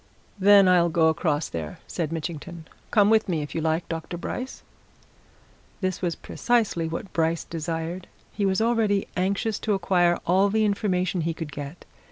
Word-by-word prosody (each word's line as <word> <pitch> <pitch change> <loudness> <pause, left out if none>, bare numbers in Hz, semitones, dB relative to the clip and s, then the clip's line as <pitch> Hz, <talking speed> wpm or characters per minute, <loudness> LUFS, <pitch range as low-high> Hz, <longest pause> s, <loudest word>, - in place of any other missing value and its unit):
"Then 200 0 +7
I'll 175 -2 +5
go 160 -1 +3
across 155 -2 0
there," 80 -2 -6
said 165 -3 -3
Mitchington. 165 +1 -6 0.2
"Come 210 -1 +4
with 220 -2 +3
me, 160 -4 0
if 145 - -8
you 165 - -2
like, 160 +1 0
Dr. 165 +1 -5
Bryce." 255 +8 -5 1.2
This 185 -2 -2
was 175 -3 -1
precisely 220 -9 0
what 165 +4 -6
Bryce 165 0 +1
desired 165 +2 -4 0.3
he 205 - -2
was 195 +1 +2
already 225 -4 +2
anxious 200 +3 0
to 210 -2 0
acquire 175 -2 +2
all 190 +3 +3
the 215 +1 +2
information 185 -3 0
he 165 0 -2
could 160 -3 -6
get. 145 +4 -8
175 Hz, 165 wpm, -25 LUFS, 165-200 Hz, 1.2 s, Then